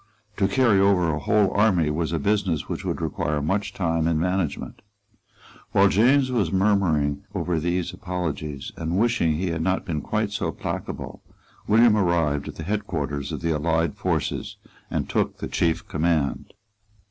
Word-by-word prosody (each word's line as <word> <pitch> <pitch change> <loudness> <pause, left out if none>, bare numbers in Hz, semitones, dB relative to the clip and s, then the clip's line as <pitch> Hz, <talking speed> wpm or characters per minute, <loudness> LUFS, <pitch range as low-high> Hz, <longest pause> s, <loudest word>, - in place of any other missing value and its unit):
To 95 - +3
carry 110 -1 +3
over 95 -4 +3
a 75 - -2
whole 100 +6 +2
army 95 -7 +3
was 80 +1 -1
a 85 - 0
business 95 -1 0
which - - -4
would - - -3
require 75 0 -1
much 95 +7 -1
time 85 -4 0
and 80 -2 +1
management. 90 -2 -2 0.9
While 100 0 +5
James 130 +6 +4
was 105 -9 +1
murmuring 95 -8 +2
over 85 -2 0
these 90 +3 -1
apologies, 80 -6 -4
and 85 +2 -2
wishing 110 -7 +2
that - - -2
he 90 0 -1
had 85 -1 -2
not 95 +3 0
been 80 -5 -2
quite 105 +5 -1
so 100 - -2
placable, - - -6 0.5
William 115 +1 +5
arrived 85 -7 +1
at - - -7
the 80 - -7
head 105 +4 -2
quarters 70 -3 -3
of - - -4
the 85 -1 0
allied 80 +1 0
forces, - - -2 0.3
and - - -2
took - - -1
the - - -5
chief 85 -1 0
command. 80 -3 0
85 Hz, 170 wpm, -24 LUFS, 80-100 Hz, 0.9 s, While